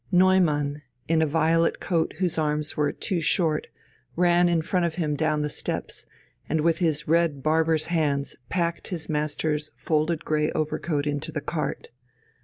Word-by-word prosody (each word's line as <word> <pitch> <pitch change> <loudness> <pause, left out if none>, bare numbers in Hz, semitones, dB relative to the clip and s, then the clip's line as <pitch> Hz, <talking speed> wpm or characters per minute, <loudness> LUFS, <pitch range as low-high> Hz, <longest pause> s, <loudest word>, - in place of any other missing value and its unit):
Neumann, 170 -6 +3 0.3
in 165 0 +3
a 160 - +3
violet 165 +2 +2
coat 165 -3 -1
whose 180 -3 0
arms 150 0 -1
were 150 -2 +1
too 180 -3 -2
short, 160 -2 +1 0.5
ran 175 0 +4
in 165 -2 +1
front 180 +2 0
of 170 -2 -1
him 155 -4 -1
down 155 0 0
the - - 0
steps 145 - -4 0.4
and 160 - +1
with 165 +1 +2
his 160 -4 0
red 160 -4 +2
barber's 160 0 +2
hands 145 -5 0
packed 170 -1 -1
his 170 -4 -4
master's 150 0 -1
folded 155 +1 0
grey 150 0 +1
over 155 -1 -1
coat 150 -4 -1
into 145 0 -2
the 150 - -2
cart. 155 +1 -4
160 Hz, 165 wpm, -25 LUFS, 150-170 Hz, 0.5 s, ran